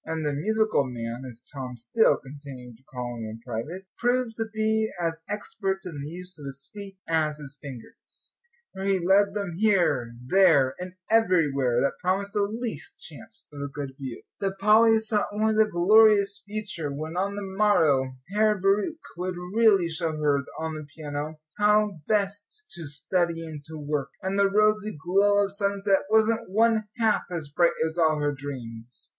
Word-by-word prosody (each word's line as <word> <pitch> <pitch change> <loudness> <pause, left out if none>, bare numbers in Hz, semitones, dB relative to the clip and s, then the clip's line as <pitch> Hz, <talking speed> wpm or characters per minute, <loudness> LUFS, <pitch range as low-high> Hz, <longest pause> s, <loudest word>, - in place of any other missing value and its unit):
And 160 -1 -3
the 145 - 0
"musical 215 +3 +1
man," 120 0 -5
as 120 -1 -7
Tom 130 -3 -6
still 120 - +3
continued 135 -3 -11
to 130 - -23
call 125 -2 -6
him 115 - -6
in 110 +1 -7
private, 145 +11 -5
proved 245 -1 +1
to 225 - -1
be 220 0 +1
as 165 -1 -2
expert 200 -2 -3
in 155 -6 -6
the 145 - -5
use 180 0 -7
of 145 - -9
his 140 +1 -11
feet 200 -2 -9
as 155 -2 +1
his 145 -1 -10
fingers, 130 -5 -12 0.3
for 190 - -6
he 195 -1 +2
led 195 +3 +3
them 200 -5 -3
here, 170 - +2
there, 160 -5 +5
and 180 0 -6 0.2
everywhere 150 - +3
that 140 - -1
promised 195 +2 0
the 205 - +1
least 215 -5 -4
chance 225 +8 -12
of 145 - -7
a 140 - -2
good 140 -1 -6
view. 130 -3 -7 0.2
But 195 -1 -2
Polly 220 +3 +5
saw 220 -1 0
only 215 +1 +1
the 215 0 +3
glorious 200 +2 +5
future 200 -8 -4
when, 155 +4 -5
on 195 +2 -1
the 205 - -4
morrow, 165 -10 +2 0.2
Herr 210 -1 +3
Bauricke 200 - +2 0.2
would 180 +1 -3 0.2
really 215 -6 +5
show 160 -1 -2
her 145 -2 +2 0.2
on 160 0 -3
the 155 -1 -7
piano 150 0 -5 0.2
how 210 -3 +3
best 205 - -1
to 170 - -8
study 170 +2 -1
and 155 -2 -8
to 160 +1 -9
work! 145 -2 -2
And 190 +1 -1
the 200 0 +4
rosy 215 -1 +2
glow 200 +5 +3
of 195 - -6
sunset 200 -1 +1
wasn't 220 0 +2
one 220 +2 +3
half 225 -3 +2
as 165 -5 -4
bright 170 +4 +3
as 160 +2 -3
all 155 -2 +3
her 145 0 +1
dreams. 125 -4 -8
180 Hz, 175 wpm, -26 LUFS, 145-210 Hz, 0.3 s, there